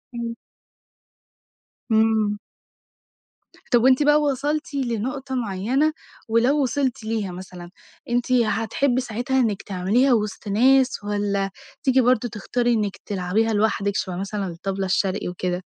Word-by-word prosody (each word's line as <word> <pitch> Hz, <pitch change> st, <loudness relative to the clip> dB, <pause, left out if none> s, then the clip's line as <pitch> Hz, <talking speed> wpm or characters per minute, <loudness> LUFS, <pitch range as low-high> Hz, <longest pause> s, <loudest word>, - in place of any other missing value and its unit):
إمم. 235 Hz, -1 st, -3 dB, 1.6 s
إمم. 220 Hz, -2 st, +2 dB, 1.3 s
طب 240 Hz, -1 st, +4 dB
وأنتِ 260 Hz, +3 st, +5 dB
بقى 295 Hz, +1 st, +5 dB
وصلتِ 295 Hz, +2 st, -1 dB
لنقطة 260 Hz, +1 st, -2 dB
معينة، 245 Hz, +7 st, 0 dB, 0.3 s
ولو 240 Hz, +6 st, +3 dB
وصلتِ 260 Hz, -3 st, -1 dB
ليها 220 Hz, -4 st, -2 dB
مثلًا 180 Hz, -1 st, -9 dB, 0.4 s
أنتِ 245 Hz, +1 st, 0 dB
هتحبي 245 Hz, +2 st, +1 dB
ساعتها 245 Hz, +2 st, -1 dB
إنك 215 Hz, -6 st, 0 dB
تعمليها 205 Hz, +8 st, +2 dB
وسط 210 Hz, -2 st, -2 dB
ناس، 255 Hz, +3 st, +3 dB
والَّا 205 Hz, -1 st, -1 dB, 0.3 s
تيجي 260 Hz, -1 st, +4 dB
برضه 245 Hz, -1 st, +2 dB
تختاري 240 Hz, +4 st, -1 dB
إنك 210 Hz, -3 st, -1 dB
تلعبيها 205 Hz, +4 st, 0 dB
لوحدِك 205 Hz, -1 st, +1 dB
شبه 185 Hz, -2 st, -2 dB
مثلًا 195 Hz, +2 st, -3 dB
الطبلة 190 Hz, +3 st, -3 dB
الشرقي 190 Hz, 0 st, 0 dB
وكده؟ 180 Hz, 0 st, -3 dB
225 Hz, 120 wpm, -23 LUFS, 200-255 Hz, 1.6 s, وأنتِ